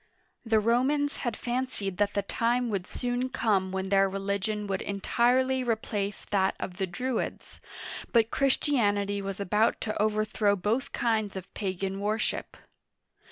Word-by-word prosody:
The 225 -2 +3
Romans 265 +6 +2
had 240 -4 -2
fancied 240 -6 -2
that 205 0 +1
the 200 - +1
time 235 +4 +1
would 190 -3 -2
soon 245 +1 -2
come 200 -7 +1
when 190 0 -2
their 195 0 +4
religion 200 +2 -2
would 195 -1 -2
entirely 250 +6 +2
replace 215 -4 -2
that 195 -1 +2
of 180 - -5
the 190 -1 -1
Druids, 250 +7 -3 0.5
but 230 -2 +4
Christianity 205 -8 +2
was 195 0 -5
about 210 +3 +2
to 215 -1 -2
overthrow 215 -1 +2
both 210 +7 -1
kinds 220 -4 0
of 190 0 -8
pagan 195 0 -3
worship. 215 +2 -1
210 Hz, 140 wpm, -28 LUFS, 195-240 Hz, 0.5 s, their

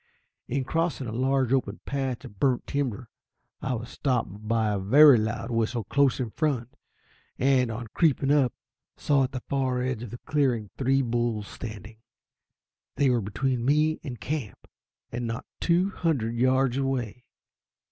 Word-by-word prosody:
In 135 +2 -1
crossing 160 0 -1
a 110 - -4
large 130 +1 +1
open 110 -6 0
patch 135 -3 -3
of 100 - -13
burnt 130 -3 +1
timber, 130 -4 -2 0.5
I 130 -1 -1
was 115 +1 -6
stopped 115 -6 -2
by 110 -1 +1
a 100 - -1
very 135 +6 +7
loud 110 +3 -3
whistle 115 0 0
close 135 +5 +2
in 120 -4 -2
front; 130 -6 -1 0.6
and, 130 -2 +3
on 115 +2 -5
creeping 145 -4 +2
up, 140 -5 +4 0.5
saw 145 -2 +2
on 135 - +3
the 125 - -5
far 130 -2 0
edge 130 -3 -2
of 120 - -6
the 120 - -7
clearing 125 -9 0
three 135 +1 +2
bulls 120 -3 -1
standing. 110 0 -8 1.0
They 140 -3 +3
were 120 -2 +2
between 120 +5 -1
me 150 +4 +2
and 125 -6 -6
camp, 130 0 -5 0.4
and 120 -1 -3
not 115 +2 -4
two 180 +3 +2
hundred 140 -12 -1
yards 130 +1 +2
away. 125 -3 -2
125 Hz, 155 wpm, -27 LUFS, 115-135 Hz, 1.0 s, very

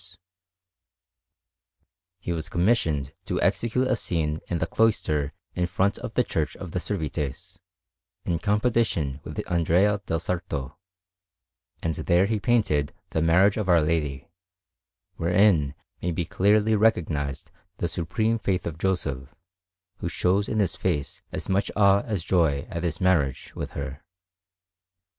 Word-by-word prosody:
Annunziata_) - - -10
Anderson] - - -24 2.0
He 90 - -3
was 80 -2 -4
commissioned 85 - +1
to - - -1
execute 125 +3 +1
a 130 - +2
scene 80 -7 -1
in 85 - -1
the - - 0
cloister 75 -10 +1 0.2
in 90 -1 0
front 95 +3 0
of 120 -3 -7
the 125 - +4
Church 75 -8 -2
of 90 -4 -8
the 90 - -1
Servites, 75 -6 -4 0.7
in 85 -2 0
competition 105 - +1
with - - -7
Andrea 90 +4 +2
del 80 - 0
Sarto; 85 -6 -3 1.1
and 80 - 0
there 85 +4 +2
he 110 +1 0
painted 100 - +1 0.2
the 80 - 0
Marriage 90 +6 +4
of 105 -3 -2
Our 85 -1 +6
Lady, 75 -4 -1 0.9
wherein 85 -5 +3 0.3
may 90 - -1
be 85 0 -2
clearly 105 +5 +3
recognized 80 - 0 0.3
the - - -1
supreme 110 +7 0
faith 95 -4 -1
of 80 -1 -5
Joseph, 70 -9 -2 0.6
who 85 - -3
shows 95 +5 +1
in 110 - -1
his 95 -4 +1
face 75 -7 -2
as - - -4
much 95 +1 +1
awe 100 -1 +5
as 105 -7 -2
joy 80 -6 +2
at 85 - -3
his 85 -2 -1
marriage 80 -8 +1
with - - -5
her. 70 0 -5
85 Hz, 145 wpm, -26 LUFS, 75-100 Hz, 2.0 s, Our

